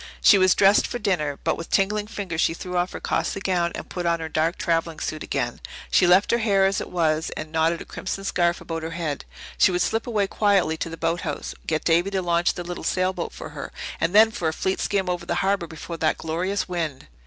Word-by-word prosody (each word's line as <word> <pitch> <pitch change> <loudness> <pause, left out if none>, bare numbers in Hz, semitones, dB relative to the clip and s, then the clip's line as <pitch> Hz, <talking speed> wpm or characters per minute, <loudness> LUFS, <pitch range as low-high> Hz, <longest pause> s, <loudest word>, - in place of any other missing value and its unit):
She 200 - +6
was 185 0 +5
dressed 200 +1 +5
for - - -4
dinner, 175 -10 -1
but - - +1
with 165 - -7
tingling 205 +2 +1
fingers 190 -7 -3
she 165 - +2
threw 180 +1 -6
off 175 +1 +1
her - - -5
costly - - -1
gown 180 -3 0
and - - -7
put 175 -1 -3
on 170 0 +1
her 160 0 -5
dark 160 +3 0
travelling 165 -1 -1
suit 155 - -4
again. - - -3 0.3
She 180 - +5
left 185 +3 +5
her 235 - +3
hair 200 -4 +3
as 195 0 +1
it - - -6
was 160 -3 +1
and 155 0 -6
knotted 165 +1 +1
a - - -8
crimson 195 0 -5
scarf 175 -3 +1
about 165 -1 -4
her 160 - -4
head. 155 -4 -3 0.3
She - - +6
would 180 -1 +1
slip 225 +6 -1
away 215 -4 +1
quietly 195 -5 +2
to 165 - -3
the 165 - -7
boathouse, 165 -2 -2
get 155 -1 0
Davy 170 +3 +3
to 195 -1 -1
launch 170 0 +1
the 175 - -5
little 175 0 -6
sailboat 185 -1 -1
for - - -8
her - - -7 0.3
and 170 +4 0
then 220 +1 +7
for 175 -6 -2
a 160 - 0
fleet 190 +3 -1
skim 195 -2 0
over 175 -1 -3
the 170 - 0
harbour 195 -3 +1
before 165 +1 -7
that 160 -1 +1
glorious 180 +5 -2
wind! 165 -7 -3
175 Hz, 235 wpm, -24 LUFS, 165-195 Hz, 0.3 s, then